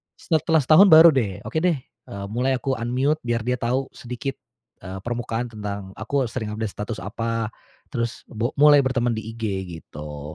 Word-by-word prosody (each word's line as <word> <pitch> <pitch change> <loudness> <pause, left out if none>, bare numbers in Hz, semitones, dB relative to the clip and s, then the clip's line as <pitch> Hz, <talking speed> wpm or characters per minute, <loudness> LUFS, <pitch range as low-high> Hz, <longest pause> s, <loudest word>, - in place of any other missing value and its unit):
setelah 160 -1 +1
setahun 155 +9 +7
baru 165 +1 +10
deh. 105 - -1
“Oke 110 +9 -5
deh,” 175 +1 +3
eee, 100 0 -10
mulai 125 +4 0
aku 130 0 -1
unmute 130 +6 0
biar 120 -1 0
dia 125 +3 -1
tahu 125 +3 -1
sedikit, 125 +3 -5 0.5
eee, 95 0 -6
permukaan 120 +1 -3
tentang 100 -3 -6
aku 125 +2 -1
sering 110 -4 -4
update 110 -2 -3
status 105 -2 -4
apa 115 +2 -2 0.4
terus 115 0 -3
bok 115 +2 -2
mulai 145 0 +7
berteman 120 -2 +1
di 110 - -5
IG 115 - -9 0.4
gitu. 75 0 -9
120 Hz, 170 wpm, -23 LUFS, 110-135 Hz, 0.5 s, baru